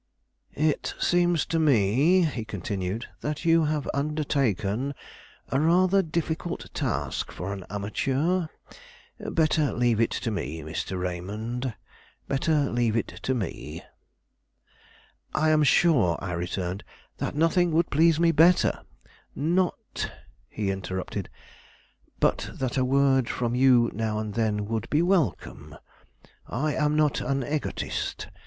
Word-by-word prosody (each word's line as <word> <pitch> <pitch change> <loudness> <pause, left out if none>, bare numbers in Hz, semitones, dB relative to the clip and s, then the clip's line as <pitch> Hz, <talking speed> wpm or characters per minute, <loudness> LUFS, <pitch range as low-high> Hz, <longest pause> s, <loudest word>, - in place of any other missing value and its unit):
"It 155 0 0
seems 175 -2 +2
to 165 - -1
me," 145 - +4
he 140 -8 -1
continued, 100 0 -4
"that 150 +3 -4
you 165 -1 +4
have 150 -1 -1
undertaken 140 - -1 0.5
a 135 - +1
rather 180 +5 +4
difficult 165 0 -3
task - - -2
for 95 +3 -5
an 95 -3 -7
amateur. 135 - 0 0.7
Better 155 -2 +1
leave 120 -2 +2
it 115 - +3
to 115 - -3
me, 80 -5 -4
Mr. 80 +4 -4
Raymond; 105 +7 -4 0.5
better 145 +1 +1
leave 115 -2 +1
it 115 - -1
to 130 - 0
me." 80 - -5 1.5
"I 155 0 +3
am 155 0 +4
sure," 140 - +4
I 95 - -5
returned, 90 +2 -3 0.3
"that - - -3
nothing 165 +3 +3
would 165 +1 +2
please 160 +2 +4
me 170 0 +4
better 170 +3 +4 0.3
" - - -32 0.2
"Not," 185 -2 -2 0.4
he 100 -2 -2
interrupted, 95 -1 -4 0.9
"but - - +1
that 130 -2 -2
a 130 - +2
word 135 -1 +3
from 120 -1 -1
you 125 -2 +4
now 110 0 -2
and 110 -1 -3
then 105 -2 0
would 110 0 -3
be 150 +3 +2
welcome. 130 - -1 0.7
I 145 +6 -1
am 150 -1 +1
not 150 -2 +2
an 135 +1 -1
egotist. 150 +3 -3
130 Hz, 130 wpm, -26 LUFS, 105-155 Hz, 1.5 s, me